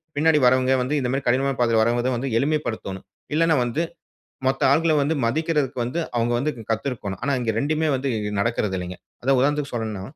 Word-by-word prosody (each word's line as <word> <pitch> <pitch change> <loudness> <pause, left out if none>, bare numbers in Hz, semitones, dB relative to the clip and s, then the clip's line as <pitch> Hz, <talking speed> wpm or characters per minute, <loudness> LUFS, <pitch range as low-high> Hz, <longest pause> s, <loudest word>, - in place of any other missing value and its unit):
பின்னாடி 155 +1 +4
வரவங்க 130 +1 +3
வந்து 135 +4 -1
இந்த 125 -2 -1
மாரி 135 +1 -1
கடினமான 135 +2 +1
பாதையில 115 -2 +3
வரவங்க 120 +1 0
எளிமைப்படுத்தனோம். 120 -9 -2 0.3
இல்லனா 165 -1 +3
வந்து 120 +7 -1 0.7
மொத்த 135 0 0
ஆட்கள, 160 +3 +3
வந்து 150 +3 +1
மதிக்கறதுக்கு 145 0 0
வந்து 125 +8 -2 0.2
அவங்க 120 0 +1
வந்து 150 +5 0 0.2
கத்துருக்கணும். 110 -5 -3
ஆனா 140 - 0
இங்க 115 -2 0
2மே 155 +3 0
வந்து 135 +1 -2 0.3
நடக்கறது 105 -2 0
இல்லைங்க. 90 0 -5 0.3
அதாவது 135 +1 +3
உதாரணத்துக்கு 145 +1 +1
சொல்னுனா, 110 -4 -3
130 Hz, 165 wpm, -23 LUFS, 115-145 Hz, 0.7 s, பின்னாடி